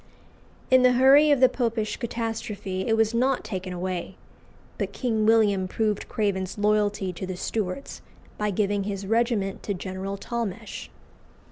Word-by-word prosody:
In 260 0 +7
the 250 0 +5
hurry 270 +4 +6
of 285 -3 +3
the 255 - +8
Popish 230 -4 -1
catastrophe 220 -5 -4
it 225 -1 +2
was 220 0 +2
not 255 +3 +1
taken 185 -2 -5
away. 180 0 -4 0.6
But - - -2
King 220 -4 0
William 205 -4 +4
proved 210 +1 -1
Craven's 195 -3 -1
loyalty 205 -2 +1
to 185 +2 -6
the 185 -1 -5
Stuarts 215 +6 -4 0.3
by 210 0 -1
giving 200 0 0
his 200 -1 -4
regiment 225 -2 0
to 200 - -3
General 190 +2 -5
Talmash. 230 -3 -5
210 Hz, 145 wpm, -25 LUFS, 190-230 Hz, 0.6 s, the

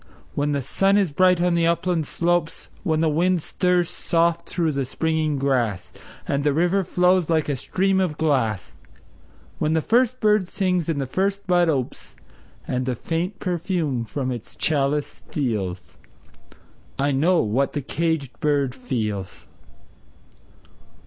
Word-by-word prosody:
When 145 +1 0
the 140 -1 0
sun 195 +10 +2
is 195 -6 +2
bright 180 +3 +4
on 180 0 +2
the 170 -1 +2
upland 170 -2 0
slopes; 175 -1 -1
When 160 -5 0
the 165 - +3
wind 170 +2 +1
stirs 180 -1 +1
soft 170 0 0
through 165 -3 0
the 140 -1 -1
springing 155 +2 -1
grass, 125 -8 -1 0.3
And 140 0 0
the 145 -1 +2
river 175 +4 +2
flows 180 -1 +2
like 160 -2 +2
a 145 - 0
stream 190 +8 0
of 175 -6 -1
glass; 130 - 0 0.8
When 155 +1 +1
the 160 - +3
first 250 +2 +2
bird 210 -4 +3
sings 180 -3 0
and 155 -3 0
the 135 - -1
first 195 +8 -1
bud 175 -2 +3
opes, 135 -5 -3 0.5
And 125 0 -2
the 125 - 0
faint 170 - -3
perfume 170 -8 -1
from 130 +3 -3
its 120 -3 -7
chalice 145 -1 +1 0.2
steals 100 - -3 1.0
I 140 +1 +1
know 165 +5 +3
what 120 +6 0
the 145 - -2
caged 155 -5 -2
bird 140 -4 +1
feels! 105 - -4
160 Hz, 150 wpm, -23 LUFS, 140-180 Hz, 1.0 s, bright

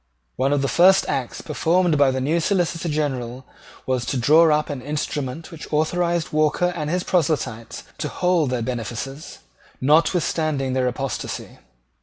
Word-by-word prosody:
One 135 +2 +1
of 145 -1 +1
the - - +1
first 190 +6 +5
acts 130 -3 -3
performed 175 0 +1
by 140 -2 +4
the 130 0 -1
new 150 +6 +1
Solicitor 170 -1 0
General 130 -4 -3 0.4
was 130 -2 0
to 135 - -1
draw 155 +7 +5
up 150 0 +2
an 140 -3 -5
instrument 145 +2 -4
which 165 -1 -10
authorised 170 +2 0
Walker 155 +4 +2
and 150 -2 -3
his 180 +2 0
proselytes 145 -11 -1 0.2
to - - -2
hold 180 -5 +1
their 125 -2 -1
benefices, 125 +4 -5 0.4
notwithstanding 155 -2 +1
their 130 -1 +1
apostasy. 135 +2 -4
150 Hz, 150 wpm, -22 LUFS, 130-165 Hz, 0.4 s, first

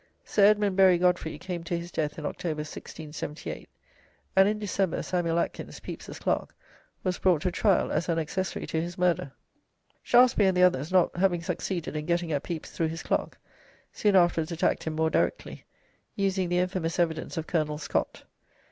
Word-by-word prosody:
Sir. 200 - +4
Edmund 205 -2 +4
Berry 190 -2 +6
Godfrey 180 -2 +1
came 175 -3 -5
to 170 +1 -2
his 170 +1 -7
death 150 -2 -2
in 155 - -6
October, 155 0 -3
1678, 155 0 -7 0.7
and 195 +1 +6
in 210 - -1
December 195 -4 -1
Samuel 170 -2 0
Atkins, - - -3
Pepys's - - -8
clerk, - - -2 0.5
was 185 -2 -1
brought 180 -4 +3
to 180 - +1
trial 200 +1 +2
as 170 - -1
an 165 - +1
accessory 170 +4 -2
to 160 - -1
his 175 +3 -5
murder. 180 -4 +1 0.7
Shaftesbury 240 -5 +5
and 185 -1 +2
the 180 - +5
others 155 -3 +2
not 185 -2 +3
having 175 -2 +2
succeeded 170 -1 -3
in 150 +1 -4
getting 170 -1 0
at 145 -2 0
Pepys 165 -1 -6
through 165 - -1
his 165 +2 -5
clerk, - - -1 0.6
soon 205 -2 +2
afterwards 175 -3 +3
attacked 170 - 0
him 160 - -2
more 160 0 +1
directly, - - -1 0.5
using 190 -2 0
the 175 - +1
infamous 180 -2 -1
evidence 165 -3 -1
of 160 - -2
Colonel 155 -3 -1
Scott. 150 - -2
175 Hz, 175 wpm, -27 LUFS, 160-185 Hz, 0.7 s, Berry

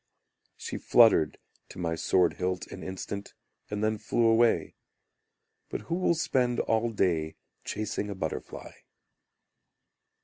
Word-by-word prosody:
She - - -5
fluttered 110 -9 +5 0.3
to - - -12
my 85 -2 -1
sword 85 +1 +2
hilt 90 0 -2
an - - -8
instant, 95 +2 -6 0.3
And 105 0 -3
then 110 0 0
flew 115 +2 +1
away; 115 +1 +3 1.0
But - - -4
who 170 - -5
will 180 -1 +2
spend 125 -6 +1
all 115 +1 +1
day 85 -7 0 0.3
chasing 105 0 -3
a 100 - -4
butterfly? 80 -4 -5
105 Hz, 125 wpm, -28 LUFS, 90-115 Hz, 1.0 s, fluttered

